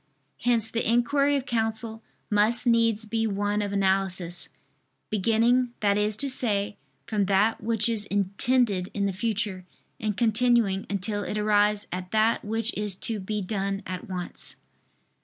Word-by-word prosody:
Hence 230 -2 +1
the 230 - -1
inquiry 280 +4 +2
of 270 -2 -2
counsel 225 -2 -1 0.3
must 215 +4 +3
needs 230 -2 +2
be 225 +1 -1
one 205 0 -1
of 205 -1 -3
analysis, 190 -3 -1 0.6
beginning 230 +4 +2
that 200 -1 +3
is 210 0 +1
to 280 - 0
say, 210 -6 +1 0.3
from 215 -3 0
that 200 +4 +2
which 220 0 +2
is 225 -3 0
intended 200 0 +1
in 200 -1 0
the 195 - -1
future, 205 -2 -1 0.4
and 210 -2 -2
continuing 230 -4 +2
until 205 +1 -1
it 210 - -4
arrives 210 0 +2
at 180 0 -5
that 220 +2 +2
which 225 +2 -2
is 210 -2 0
to 220 +3 -2
be 205 +1 -3
done 195 0 -3
at 185 0 -6
once. 180 -2 -5
210 Hz, 150 wpm, -26 LUFS, 200-230 Hz, 0.6 s, must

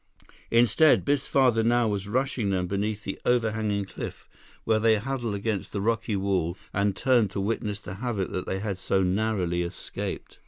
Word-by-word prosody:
Instead, 120 +6 +4
Biff's 140 -1 +1
father 125 -5 +3
now 120 +1 +3
was 100 -2 -2
rushing 125 -1 0
them 95 -2 0
beneath 100 +3 -2
the 95 - -5
overhanging 110 -4 +1
cliff, - - -8 0.4
where 110 -1 +2
they 110 0 +4
huddled 120 -1 -2
against 100 0 -2
the 100 - -3
rocky 115 +1 0
wall 95 -3 0 0.2
and 100 0 +1
turned 120 -4 +3
to 100 - -4
witness 105 0 -2
the 95 -3 -8
havoc 105 -2 -3
that 90 - -4
they 95 - -1
had 100 -1 -3
so 95 0 +1
narrowly 90 -2 0
escaped. 85 0 -6
105 Hz, 170 wpm, -27 LUFS, 95-115 Hz, 0.4 s, Instead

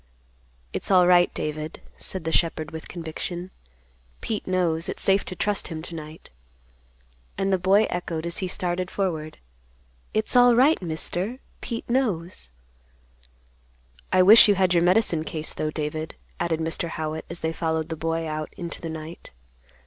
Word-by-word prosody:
"It's - - -3
all 185 -2 +6
right, 175 0 +5
David," 155 +1 -4 0.2
said 190 -3 -4
the 165 - -2
shepherd 160 -2 0
with 160 0 -7
conviction. 175 +2 -6 0.7
"Pete 215 -2 -4
knows. 175 -3 0
It - - -4
is - - -1
safe 195 0 +4
to 185 - -5
trust 205 +2 -1
him 160 -2 -6
to 170 - -8
night." 155 0 -9 1.1
And 195 0 +1
the 190 - +2
boy 195 +4 +4
echoed, 170 -2 -3
as 170 +4 -1
he 190 - -2
started 180 -1 -2
forward, 160 -6 -3 0.7
"It's 215 +3 0
alright, 245 +4 +6
Mister; 180 +6 -2 0.2
Pete 230 -2 -5
knows." 185 - -1 1.6
"I 185 0 +5
wish 215 +5 +9
you 205 - +4
had 185 -1 +3
your 170 - +4
medicine 175 -2 +3
case, 155 -1 -3
though, 155 - -2
David," 155 +1 -4 0.2
added 165 -2 0
Mr. 165 +1 -2
Howitt, 155 -1 -4
as 170 - -4
they 160 0 -1
followed 160 -1 -1
the 160 - -3
boy 165 +1 -2
out 155 0 -4
into 170 -1 -6
the 165 - -4
night. 160 +1 -8
170 Hz, 160 wpm, -25 LUFS, 160-190 Hz, 1.6 s, wish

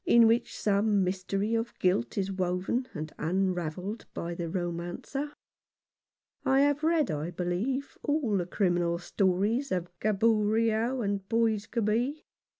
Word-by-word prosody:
No. - - +3
29. 235 - +8
in - - +7
which 230 +1 +1
some 205 -1 +2
mystery 195 +3 -1
of 230 +1 -1
guilt 180 -11 +1
is 195 -1 0
woven 185 +7 -1
and 155 0 -5
un 185 +3 +1
ravelled 180 +5 -4
by 170 +1 -3
the 170 -1 -4
romancer. 175 - -3 1.1
I 265 +1 +4
have 290 0 +3
read, 315 - +2
I 155 +2 -2
believe, 185 +11 -2
all 290 -8 +1
the 175 -2 -1
criminal 175 -3 +1
stories 200 +9 0
of 180 -1 -1
Gaboriau 220 +3 +2
and 200 -2 0
Boisgobey. 230 +4 +1
205 Hz, 140 wpm, -29 LUFS, 180-230 Hz, 1.1 s, 29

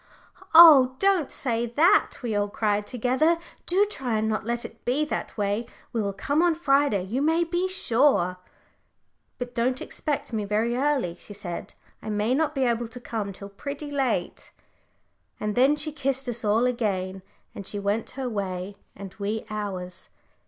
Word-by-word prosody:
"Oh! 285 -6 +9
don't 390 -5 +2
say 240 -2 -1
that," 335 - +4
we 225 -3 -1
all 205 0 +1
cried 210 -1 0
together; 255 +8 +2 0.3
"do 385 +4 +3
try 265 - -3
and 215 0 0
not 215 0 -1
let 235 0 -2
it 225 - -11
be 275 +5 +1
that 300 - -4
way. 205 +3 -1 0.3
We 230 - 0
will 200 -1 -1
come 285 +10 0
on 345 -2 +3
Friday, 280 - +2
you 225 +9 -2
may 325 +3 +3
be 350 +2 -1
sure." 230 - +2 1.0
"But 245 0 -6
don't 250 +2 0
expect 290 -5 -4
me 215 -2 -1
very 215 +4 0
early," 260 -10 0
she 205 - -11
said. 175 -3 -6 0.3
"I 215 - -6
may 210 +3 0
not 300 +2 0
be 270 - +1
able 235 -1 0
to 230 +2 -10
come 220 -4 -4
till 200 +1 -10
pretty 285 +8 -7
late." 260 -10 -2 0.9
And 210 0 -2
then 265 +6 +4
she 300 +1 -3
kissed 275 -2 -2
us 240 -1 -1
all 215 +3 +3
again, 195 -6 -1 0.3
and 200 - -7
she 205 - -3
went 205 +2 -1
her 265 -2 -2
way, 195 -3 -4 0.2
and 195 -1 -9
we 210 +2 -2
ours. 190 -4 -5
235 Hz, 175 wpm, -25 LUFS, 205-280 Hz, 1.0 s, Oh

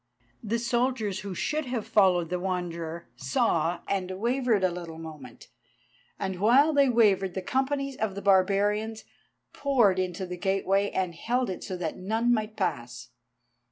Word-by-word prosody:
The 225 +2 -1
soldiers 235 -3 0
who 195 -1 -6
should 305 - -1
have 245 -3 -3
followed 185 -6 +3
the 180 - -1
Wanderer 170 -3 -4
saw 160 +6 0
and 190 -2 -1
wavered 240 -3 +1
a 185 - +3
little 170 -2 -7
moment, 150 -7 -10 0.7
and 190 -2 -4
while 265 +10 +5
they 280 -2 +4
wavered 200 -6 +3
the 190 - -2
companies 275 +3 -1
of 215 -3 -2
the 200 - -5
barbarians 205 +3 +2 0.5
poured 240 -10 +2
into 185 0 -2
the 180 0 -6
gateway 195 +1 +1
and 185 -2 -2
held 240 +6 -1
it 185 - -6
so 185 - -5
that 165 -3 -4
none 225 +6 +1
might 215 -1 -2
pass. 120 - -3
195 Hz, 155 wpm, -27 LUFS, 180-230 Hz, 0.7 s, while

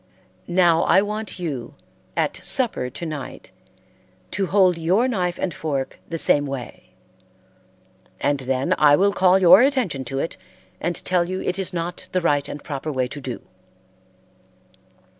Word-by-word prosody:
Now 175 -2 +3
I 190 +3 +4
want 210 0 -4
you, 145 -9 -5 0.4
at - - -1
supper 235 - +3
to 170 - -7
night, 150 -4 -7 0.8
to 195 0 -1
hold 185 -1 +3
your 180 +9 +1
knife 180 -8 -1
and 180 - -2
fork 140 -4 -4
the 165 - -3
same 145 -2 +2
way, 135 -4 -8 1.3
and 145 -1 0
then 130 0 -1
I 145 -1 +6
will 200 +4 +2
call 185 0 +4
your 190 +3 +7
attention 250 - +1
to 135 +3 -5
it 160 - -3 0.4
and 175 +1 -2
tell 180 -1 +2
you 185 0 -3
it 180 +2 -2
is 185 -1 -1
not 175 0 -5
the 185 - +1
right 145 -4 +1
and 145 - -8
proper 155 -1 -5
way 130 -2 -1
to 145 - -8
do." 130 -3 -6
170 Hz, 155 wpm, -22 LUFS, 145-185 Hz, 1.3 s, your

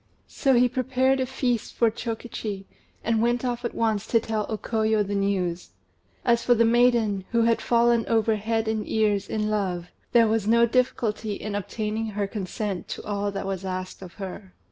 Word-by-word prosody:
So 270 -3 +1
he 245 +1 +5
prepared 260 +1 +1
a 260 - 0
feast 245 -3 -2
for 230 -2 +3
Chokichi, 220 -3 -5 0.4
and 225 -1 +1
went 240 +2 +1
off 245 -1 -2
at 235 - -3
once 220 -2 0
to 230 - +3
tell 220 -1 -2
O 220 - -2
Koyo 220 -1 +1
the 200 - -4
news. 185 - -1 0.5
As 235 -1 +3
for 245 - +4
the 230 0 +4
maiden, 230 -4 +3
who 230 -1 +4
had 230 0 +2
fallen 235 -1 +3
over 225 -1 +2
head 225 +1 -1
and 220 -1 -2
ears 210 -3 +1
in 215 -1 -1
love, 180 -4 -2 0.2
there 230 -2 +5
was 215 -1 0
no 235 +1 +5
difficulty 225 -3 0
in 210 +1 -5
obtaining 210 +2 -3
her 205 -1 -2
consent 200 -1 -4
to - - -6
all 205 0 -1
that 195 0 -4
was 195 -1 -3
asked 185 0 -5
of 180 -2 -10
her. 190 -1 -8
220 Hz, 190 wpm, -25 LUFS, 200-235 Hz, 0.5 s, he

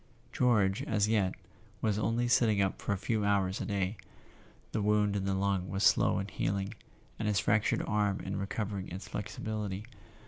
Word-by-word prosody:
George, 110 -3 +3
as 105 -6 +1
yet, 105 -4 +1 0.4
was 105 -1 0
only 115 +3 +1
sitting 115 -4 +3
up 95 -1 0
for - - -2
a 100 - +1
few 110 +2 -1
hours 100 -2 +1
a - - -3
day; 100 0 -1 0.7
the 110 - -1
wound 105 0 +2
in 95 -1 -1
the 95 0 0
lung 95 -1 0
was 95 +1 -1
slow - - +4
in 95 - -2
healing, 100 +1 -2 0.5
and 110 - -1
his 105 -2 +2
fractured 105 +1 +2
arm 105 -2 +1
in 95 +1 -4
recovering 100 -1 -3
its 90 +3 -7
flexibility. 105 -1 -4
100 Hz, 175 wpm, -31 LUFS, 95-105 Hz, 0.7 s, slow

